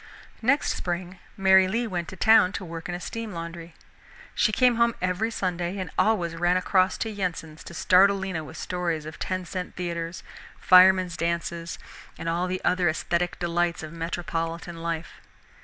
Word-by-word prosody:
Next 275 Hz, +6 st, +2 dB
spring 180 Hz, +1 st, -4 dB, 0.2 s
Mary 190 Hz, -1 st, +5 dB
Lee 230 Hz, +5 st, -1 dB
went 175 Hz, -6 st, -3 dB
to -, -, -8 dB
town 195 Hz, -1 st, +5 dB
to 185 Hz, -, -5 dB
work 165 Hz, 0 st, -7 dB
in 175 Hz, -, -2 dB
a -, -, -5 dB
steam 225 Hz, +3 st, -6 dB
laundry. 170 Hz, 0 st, -7 dB, 0.6 s
She 215 Hz, -, +2 dB
came 245 Hz, +1 st, +3 dB
home 235 Hz, 0 st, +3 dB
every 185 Hz, +5 st, 0 dB
Sunday, 180 Hz, -3 st, -2 dB
and 185 Hz, -2 st, -5 dB
always 180 Hz, -7 st, +1 dB
ran 175 Hz, +2 st, +2 dB
across 185 Hz, 0 st, +2 dB
to 225 Hz, -, -3 dB
Yensens 175 Hz, -6 st, -4 dB
to 170 Hz, -, -9 dB
startle 195 Hz, +4 st, +5 dB
Lena 190 Hz, -4 st, -3 dB
with -, -, -10 dB
stories 170 Hz, -4 st, -2 dB
of 155 Hz, 0 st, -9 dB
ten 185 Hz, -1 st, -3 dB
cent 180 Hz, +1 st, -5 dB
theaters, 170 Hz, -1 st, -4 dB, 0.4 s
firemen's 185 Hz, -1 st, +6 dB
dances, 170 Hz, 0 st, -3 dB, 0.4 s
and 165 Hz, -, -6 dB
all 170 Hz, +2 st, 0 dB
the 185 Hz, 0 st, -3 dB
other 180 Hz, -2 st, +3 dB
esthetic 170 Hz, +2 st, -1 dB
delights 175 Hz, -1 st, -1 dB
of 155 Hz, +1 st, -8 dB
metropolitan 165 Hz, 0 st, -4 dB
life. 165 Hz, 0 st, -5 dB
180 Hz, 170 wpm, -26 LUFS, 170-190 Hz, 0.6 s, firemen's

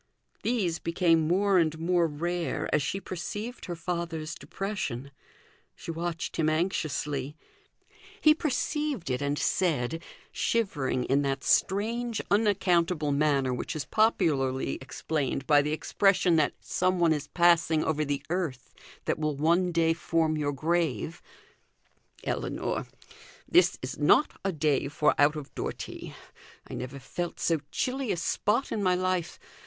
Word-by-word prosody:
These 200 Hz, -9 st, 0 dB
became 165 Hz, -2 st, +2 dB
more 190 Hz, +2 st, +3 dB
and 160 Hz, -1 st, +1 dB
more 170 Hz, +1 st, +2 dB
rare 170 Hz, +3 st, -2 dB
as 150 Hz, -, +3 dB
she 195 Hz, +7 st, -2 dB
perceived 205 Hz, +6 st, -6 dB
her 175 Hz, -, -4 dB
father's 165 Hz, -2 st, -3 dB
depression. 140 Hz, -, -4 dB, 0.6 s
She -, -, -6 dB
watched 165 Hz, 0 st, -4 dB
him 155 Hz, -1 st, +2 dB
anxiously. 150 Hz, -4 st, -1 dB, 0.8 s
He 305 Hz, -, +6 dB
perceived 295 Hz, -, -1 dB
it, 125 Hz, -, -1 dB
and 145 Hz, +1 st, 0 dB
said 165 Hz, -4 st, 0 dB, 0.3 s
shivering 150 Hz, -, 0 dB
in 135 Hz, +3 st, +2 dB
that 135 Hz, -1 st, -1 dB
strange 225 Hz, +4 st, +1 dB
unaccountable 180 Hz, -7 st, +2 dB
manner 140 Hz, -3 st, +2 dB
which 125 Hz, -, -4 dB
is 150 Hz, -, -3 dB
popularly 150 Hz, -, +1 dB
explained 135 Hz, 0 st, -2 dB
by 145 Hz, 0 st, +5 dB
the 150 Hz, +1 st, -2 dB
expression 180 Hz, +2 st, +2 dB
that 150 Hz, -2 st, +2 dB
some 185 Hz, 0 st, 0 dB
one 170 Hz, -2 st, +4 dB
is 150 Hz, -1 st, -4 dB
passing 170 Hz, -2 st, +3 dB
over 155 Hz, -1 st, 0 dB
the 140 Hz, -1 st, -2 dB
earth 165 Hz, -9 st, -3 dB, 0.3 s
that -, -, 0 dB
will 155 Hz, -1 st, 0 dB
one 170 Hz, +5 st, +2 dB
day 165 Hz, -1 st, +3 dB
form 165 Hz, -1 st, 0 dB
your 145 Hz, -1 st, 0 dB
grave 165 Hz, +2 st, -1 dB, 1.0 s
"Ellinor! -, -, -2 dB, 0.6 s
this 355 Hz, +2 st, +4 dB
is -, -, -5 dB
not 300 Hz, -, +4 dB
a 195 Hz, -, +1 dB
day 150 Hz, -4 st, +1 dB
for 150 Hz, +1 st, +2 dB
out 145 Hz, +2 st, +5 dB
of 150 Hz, -3 st, -7 dB
door -, -, -2 dB
tea. -, -, -8 dB, 0.5 s
I -, -, -9 dB
never 125 Hz, +2 st, -5 dB
felt 170 Hz, +6 st, -5 dB
so 165 Hz, -2 st, +1 dB
chilly 260 Hz, -2 st, -1 dB
a -, -, -1 dB
spot 210 Hz, +8 st, 0 dB
in 215 Hz, -, -1 dB
my 185 Hz, -2 st, +3 dB
life. 185 Hz, -2 st, -1 dB
165 Hz, 140 wpm, -28 LUFS, 145-185 Hz, 1.0 s, He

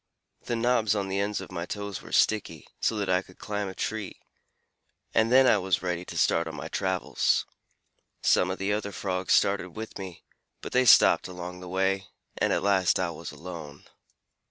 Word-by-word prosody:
The 120 Hz, -, -1 dB
knobs 115 Hz, -2 st, +2 dB
on 100 Hz, -2 st, -2 dB
the 95 Hz, +1 st, -1 dB
ends 100 Hz, +1 st, -1 dB
of -, -, -10 dB
my 85 Hz, -1 st, -4 dB
toes 100 Hz, -3 st, -5 dB
were -, -, -12 dB
sticky, 95 Hz, -7 st, +1 dB
so 115 Hz, -, +1 dB
that 100 Hz, -2 st, -1 dB
I 90 Hz, 0 st, +2 dB
could 90 Hz, -1 st, -18 dB
climb 105 Hz, -1 st, -3 dB
a 95 Hz, -, -7 dB
tree, 110 Hz, -3 st, -4 dB, 0.9 s
and 110 Hz, +1 st, +3 dB
then 130 Hz, +1 st, +7 dB
I 110 Hz, -5 st, +5 dB
was 95 Hz, -1 st, 0 dB
ready 90 Hz, -1 st, -2 dB
to -, -, -7 dB
start 85 Hz, 0 st, +2 dB
on 80 Hz, -, -6 dB
my -, -, -6 dB
travels. -, -, 0 dB, 0.8 s
Some 90 Hz, -, +3 dB
of 95 Hz, -, -3 dB
the 100 Hz, +1 st, -1 dB
other 105 Hz, -1 st, -2 dB
Frogs 95 Hz, -2 st, -1 dB
started 100 Hz, -3 st, +2 dB
with 110 Hz, -1 st, -7 dB
me, 95 Hz, -3 st, -8 dB, 0.4 s
but -, -, -8 dB
they 130 Hz, 0 st, +3 dB
stopped 115 Hz, -, +6 dB
along 90 Hz, 0 st, -7 dB
the 90 Hz, -1 st, -9 dB
way, 95 Hz, +1 st, 0 dB, 0.3 s
and -, -, +2 dB
at -, -, +1 dB
last 95 Hz, -3 st, +3 dB
I 90 Hz, -2 st, 0 dB
was 80 Hz, -, -8 dB
alone. 80 Hz, -5 st, -9 dB
95 Hz, 195 wpm, -27 LUFS, 90-105 Hz, 0.9 s, then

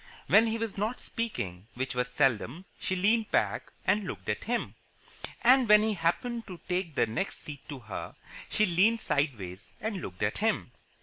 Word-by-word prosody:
When 225 Hz, -, +6 dB
he 225 Hz, 0 st, 0 dB
was 225 Hz, -3 st, -3 dB
not 220 Hz, +4 st, -1 dB
speaking 100 Hz, -, -4 dB
which 130 Hz, +2 st, -2 dB
was 125 Hz, +1 st, 0 dB
seldom 135 Hz, -, +1 dB
she 185 Hz, -, -1 dB
leaned 215 Hz, +4 st, +2 dB
back -, -, 0 dB
and 205 Hz, +2 st, +3 dB
looked 185 Hz, -, -6 dB
at 105 Hz, 0 st, -2 dB
him. 240 Hz, +1 st, -1 dB, 0.7 s
And 255 Hz, -1 st, +6 dB
when 210 Hz, 0 st, +8 dB
he 220 Hz, 0 st, +1 dB
happened 225 Hz, +7 st, -1 dB
to 180 Hz, -3 st, -8 dB
take 180 Hz, -4 st, -1 dB
the -, -, +4 dB
next 115 Hz, -, -3 dB
seat 145 Hz, -2 st, -8 dB
to 145 Hz, -, -5 dB
her, 110 Hz, -3 st, -6 dB, 0.3 s
she 215 Hz, -, +3 dB
leaned 205 Hz, +6 st, +3 dB
sideways 115 Hz, -, -2 dB
and 210 Hz, -4 st, -3 dB
looked 90 Hz, +2 st, -5 dB
at 105 Hz, -, 0 dB
him. 215 Hz, -, 0 dB
185 Hz, 180 wpm, -30 LUFS, -, 0.7 s, when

